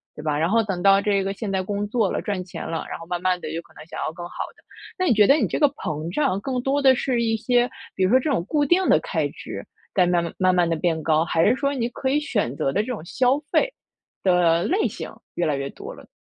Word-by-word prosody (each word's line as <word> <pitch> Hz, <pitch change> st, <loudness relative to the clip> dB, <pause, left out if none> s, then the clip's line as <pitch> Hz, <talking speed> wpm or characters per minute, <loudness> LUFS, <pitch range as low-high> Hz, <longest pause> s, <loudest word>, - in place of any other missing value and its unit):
对 150 Hz, -, -9 dB
吧？ 150 Hz, -2 st, 0 dB
然 165 Hz, +3 st, +1 dB
后 230 Hz, +1 st, +4 dB
等 190 Hz, -4 st, -3 dB
到 195 Hz, 0 st, +6 dB
这 200 Hz, -2 st, +1 dB
个 195 Hz, +1 st, -2 dB
现 200 Hz, -1 st, -5 dB
在 190 Hz, -1 st, 0 dB
工 205 Hz, +2 st, -2 dB
作 220 Hz, -3 st, +1 dB
了， -, -, -2 dB
赚 195 Hz, -3 st, -3 dB
钱 180 Hz, -, -8 dB
了， 165 Hz, -, -3 dB
然 -, -, -5 dB
后 165 Hz, -, -9 dB
慢 175 Hz, -1 st, -3 dB
慢 185 Hz, -1 st, +1 dB
地 155 Hz, -, -5 dB
有 165 Hz, -, -3 dB
可 -, -, -24 dB
能 -, -, -11 dB
想 165 Hz, -, -8 dB
要 -, -, -2 dB
更 175 Hz, +1 st, -8 dB
好 -, -, -5 dB
的。 -, -, -24 dB, 0.3 s
那 370 Hz, -, 0 dB
你 255 Hz, -, +4 dB
觉 210 Hz, -2 st, +5 dB
得 275 Hz, -, +7 dB
你 255 Hz, -10 st, +1 dB
这 -, -, -2 dB
个 290 Hz, -, +5 dB
膨 160 Hz, -, -5 dB
胀 270 Hz, -10 st, +1 dB
更 255 Hz, +2 st, -2 dB
多 280 Hz, +2 st, +1 dB
的 265 Hz, -1 st, +6 dB
是 245 Hz, -2 st, 0 dB
一 225 Hz, -1 st, +1 dB
些， 245 Hz, +2 st, +2 dB, 0.3 s
比 190 Hz, -, 0 dB
如 185 Hz, -, +3 dB
说 255 Hz, -, +5 dB
这 295 Hz, -, -2 dB
种 230 Hz, -11 st, +1 dB
固 295 Hz, +4 st, +1 dB
定 365 Hz, +5 st, +3 dB
的 -, -, +6 dB
开 -, -, -1 dB
支， -, -, -8 dB, 0.3 s
在 185 Hz, -3 st, +4 dB
慢 175 Hz, -1 st, +2 dB
慢 170 Hz, -, -5 dB
慢 185 Hz, -1 st, +3 dB
慢 175 Hz, -1 st, +3 dB
地 165 Hz, -, +1 dB
变 160 Hz, -1 st, 0 dB
高， 160 Hz, 0 st, +3 dB
还 165 Hz, 0 st, +2 dB
是 240 Hz, -, +4 dB
说 280 Hz, +1 st, -1 dB
你 240 Hz, -3 st, -1 dB
可 265 Hz, +2 st, -3 dB
以 290 Hz, -, +2 dB
选 140 Hz, -, -1 dB
择 135 Hz, -, 0 dB
的 205 Hz, -, +2 dB
这 220 Hz, -, -6 dB
种 240 Hz, -10 st, -4 dB
消 255 Hz, +8 st, +2 dB
费 -, -, +2 dB, 0.5 s
的 175 Hz, -2 st, +3 dB
类 375 Hz, -, +1 dB
型 -, -, -7 dB, 0.2 s
越 175 Hz, -, 0 dB
来 150 Hz, -2 st, +1 dB
越 140 Hz, 0 st, -3 dB
多 -, -, -9 dB
了？ -, -, -14 dB
200 Hz, 305 characters per minute, -23 LUFS, 170-255 Hz, 0.5 s, 得